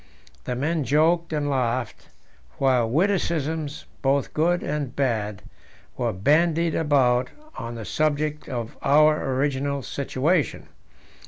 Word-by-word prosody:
The 125 - -2
men 155 +4 0
joked 165 +5 +2
and 150 -2 -1
laughed, 125 -3 -2 0.5
while 130 -4 +2
witticisms, 160 - -1 0.2
both 135 0 +1
good 175 +3 +1
and 145 -4 -3
bad, 110 -7 -1 0.5
were - - -1
bandied 160 - +2
about 130 -5 +2 0.3
on 115 0 -6
the 115 -2 -6
subject 150 +1 -1
of 120 -3 -4
our 150 0 +4
original 140 0 -1
situation. 140 +5 -1
145 Hz, 110 wpm, -24 LUFS, 130-155 Hz, 0.5 s, our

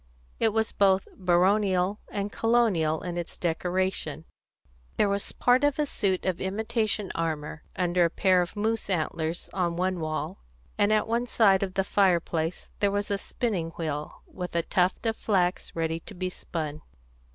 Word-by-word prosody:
It 225 - +3
was 220 +1 0
both 195 -1 +3
baronial 185 +1 +2
and 200 0 -2
colonial 210 -10 +2
in 175 -1 -3
its 170 - -6
decoration; 175 -2 -1 0.7
there - - +4
was 200 0 -2
part 250 +2 +3
of 290 -1 +3
a 300 - +2
suit 195 -9 -1
of 185 -2 -1
imitation 215 +1 -1
armour 160 -2 -3
under 180 -1 +2
a 170 - +3
pair 185 +1 +3
of 175 - -4
moose 220 +1 -1
antlers 165 -1 -1
on 175 -3 0
one 185 +1 0
wall, 155 - -3 0.4
and 205 - +2
at 215 0 +3
one 235 +2 0
side 200 -5 +4
of 190 -2 -3
the 195 - +2
fireplace 175 -4 +1
there 200 - +3
was 205 +1 -2
a 200 - 0
spinning 195 -8 -2
wheel, 150 -3 -4
with 180 -2 -7
a 170 - +2
tuft 185 +4 +1
of 225 -1 +1
flax 185 -5 0
ready 165 0 -1
to - - -11
be 185 0 -3
spun. 155 -4 -5
185 Hz, 165 wpm, -27 LUFS, 170-205 Hz, 0.7 s, there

